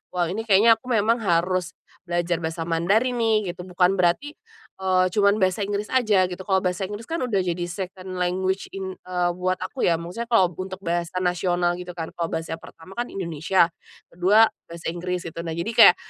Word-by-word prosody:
"Wow 175 -1 0
ini 225 +3 -4
kayaknya 220 +3 +6
aku 250 - -17
memang 225 +3 +2
harus 180 -2 0 0.3
belajar 175 0 0
bahasa 165 0 -3
Mandarin 200 +10 +2
nih." 215 -4 +2
gitu. 180 - -8
Bukan 180 +1 +2
berarti, 180 +12 +2 0.5
eee, 185 -1 +3
cuman 200 0 +4
bahasa 185 +2 +1
Inggris 205 +1 -2
aja 215 -7 +3
gitu, 180 0 -7
kalau 190 -1 +3
bahasa 180 +1 -1
Inggris 210 +2 -7
kan 330 +1 -2
udah 225 -6 +1
jadi 175 -1 -2
second 185 0 -6
language 185 +2 0
eng 190 -1 -5 0.4
buat 185 0 +1
aku 220 +8 -4
ya, 170 - +4
maksudnya 180 +8 -5
kalau 190 -5 +5
untuk 190 +1 -6
bahasa 170 0 -2
nasional 175 0 +1
gitu 180 0 -7
kan, 165 -2 -5
kalau 170 -1 -1
bahasa 160 0 -3
pertama 165 +3 -14
kan 240 - -1
Indonesia, 170 0 +1 0.4
ke-2 200 +6 +5 0.2
bahasa 170 0 -8
Inggris, 180 +1 -3
gitu. 165 0 -7
Nah 165 - -4
jadi 170 +7 -2
kayak, 225 -6 +8
185 Hz, 185 wpm, -24 LUFS, 175-205 Hz, 0.5 s, kayak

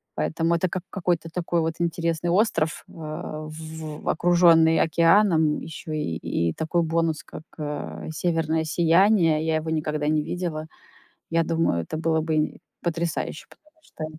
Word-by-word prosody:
Поэтому 165 +1 0
это 185 +2 +1
как 185 -1 -4
какой-то 175 -4 -1
такой 170 0 -1
вот 160 0 -1
интересный 170 0 -1
остров, 170 -5 +1
а, 155 -1 -6
в 155 -1 -7
окружённый 165 -1 +5
океаном, 165 -1 +4
ещё 160 0 -8
и 85 - -2
и 85 -1 0
такой 160 +2 0
бонус, 165 -1 0
как, 160 - -10 0.2
э, 150 +1 -5
северное 160 -1 0
сияние. 165 0 +3
Я 160 -1 +1
его 160 +1 -4
никогда 150 -1 -1
не 155 -1 +2
видела. 160 -3 -4 0.6
Я 165 0 +2
думаю, 160 - 0
это 155 - -5
было 160 0 +1
бы 160 0 -2
и 155 - 0 0.3
потрясающе, 170 -2 -2
потому 310 +1 -23
что 155 - -7
160 Hz, 150 wpm, -25 LUFS, 155-170 Hz, 0.6 s, окружённый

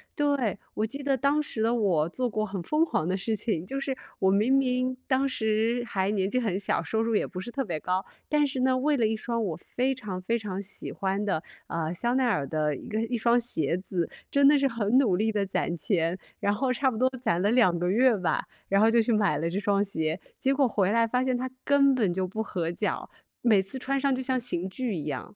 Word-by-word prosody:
对， 280 -9 0 0.2
我 215 - 0
记 275 +6 -5
得 275 -1 +1
当 280 +4 +2
时 225 -7 -3
的 230 +1 +2
我， 185 -10 +2
做 250 +7 -2
过 215 -1 -1
很 195 -2 -5
疯 305 - +2
狂 160 - -1
的 185 +1 0
事 220 +3 -1
情， 205 -5 -2
就 270 +7 -4
是 275 -1 -2 0.2
我 190 - +3
明 215 +7 +3
明 255 -1 +1
当 270 +1 +2
时 225 -1 0
还 195 -3 0
年 195 -2 0
纪 255 - +1
很 205 -6 -1
小， 200 - 0
收 220 - -1
入 225 0 0
也 - - +2
不 185 - -7
是 190 - -6
特 270 +2 -2
别 170 -6 -3
高， 185 +3 -1 0.2
但 300 -1 +3
是 265 -2 -3
呢， 255 0 +3
为 295 +3 +2
了 235 -5 +2
一 220 0 -1
双 230 +1 -2
我 180 -6 -2
非 255 +9 -1
常 205 -7 -6
非 230 +6 0
常 200 -4 -4
喜 195 0 -5
欢 195 +1 -2
的， 185 -6 0 0.3
呃， 165 -1 -2
香 235 +8 0
奈 260 -1 +3
儿 205 - +1
的 150 -1 0
一 - - -10
个 220 0 -1
一 240 +1 -2
双 235 +2 +3
鞋 170 - -1
子， 180 -2 -2 0.2
真 280 0 +5
的 295 - +7
是 275 - +3
很 230 0 +2
努 220 -10 +3
力 215 +4 +1
地 210 -2 0
攒 175 -2 -1
钱， 170 0 0 0.2
然 200 - +1
后 255 +5 0
差 265 +1 +1
不 225 - -5
多 255 +3 +3
攒 220 -8 0
了 200 - +2
2 225 -8 +4
个 175 +1 0
月 240 +4 +4
吧， 185 -4 -1 0.2
然 195 - +3
后 220 +2 +5
就 235 0 +5
去 225 - 0
买 200 -9 +2
了 165 +2 -1
这 185 +4 -2
双 200 -1 +2
鞋。 160 -4 -2 0.2
结 270 - +1
果 275 -1 +3
回 200 -4 +1
来 230 +1 +3
发 250 +3 +1
现 260 -1 +1
它 255 +1 -2
根 275 -1 +4
本 210 -8 +1
就 185 +1 -1
不 215 +4 -3
合 170 -5 -2
脚， 175 - -3 0.3
每 215 -5 +4
次 195 +8 -5
穿 275 +2 -1
上 275 0 +2
就 260 - -2
像 260 0 0
刑 190 -7 -3
具 240 +3 -3
一 155 -5 -4
样。 145 +6 -5
220 Hz, 265 characters per minute, -27 LUFS, 190-255 Hz, 0.3 s, 的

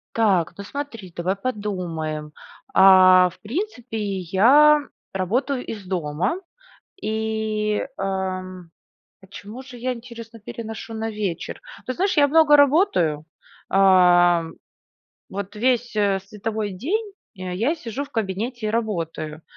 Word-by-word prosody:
Так, 195 -7 +2
ну 200 - -6
смотри, 230 -8 -7
давай 185 +3 -1
подумаем. 175 -9 -4 0.4
А, 185 -1 +7
в - - -18
принципе, 250 - -4 0.2
я 265 - +5 0.3
работаю 250 +8 -1
из 205 -4 -7
дома 180 - -1 0.6
и, 220 -1 -1
ам, 185 -2 -4 0.5
почему 205 +6 -10
же 260 -2 -12
я, 255 +2 -1
интересно, 230 -1 -11
переношу 225 +1 -7
на 220 0 -3
вечер? 205 -6 -4 0.3
Ты 255 - -2
знаешь, 380 -1 0
я 285 -1 +5
много 300 -1 +6
работаю, 280 - +3 0.5
а, 180 -3 +5 0.9
вот 200 +2 -6
весь, 240 0 +1
э, 200 -2 +2
световой 210 0 -4
день 395 - -2 0.2
я 185 - -1
сижу 255 +1 -5
в 285 - -17
кабинете 220 +2 -3
и - - 0
работаю. 165 -8 -3
210 Hz, 115 wpm, -23 LUFS, 185-245 Hz, 0.9 s, А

